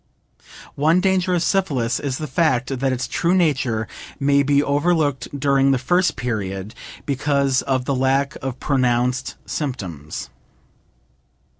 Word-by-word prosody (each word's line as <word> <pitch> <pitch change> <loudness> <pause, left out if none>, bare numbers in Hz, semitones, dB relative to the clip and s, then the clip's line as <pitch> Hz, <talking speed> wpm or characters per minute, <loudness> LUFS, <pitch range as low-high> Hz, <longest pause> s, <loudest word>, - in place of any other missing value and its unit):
One 160 +5 +3
danger 185 -1 +2
of 170 - +1
syphilis 140 - 0
is 135 -3 -3
the 155 - -4
fact 135 -3 0
that 135 0 +1
its 125 -1 -2
true 170 +2 +1
nature 130 -10 +1 0.3
may 140 0 +3
be 140 +1 +3
overlooked 145 -1 +1
during 140 -1 +3
the 135 - +3
first 175 +6 +1
period, 105 -4 -4 0.3
because 140 -1 +1
of 130 -2 -1
the 140 - 0
lack 135 +2 +1
of 130 -1 -4
pronounced 125 -2 0
symptoms. 90 - -5
135 Hz, 130 wpm, -21 LUFS, 125-150 Hz, 0.3 s, One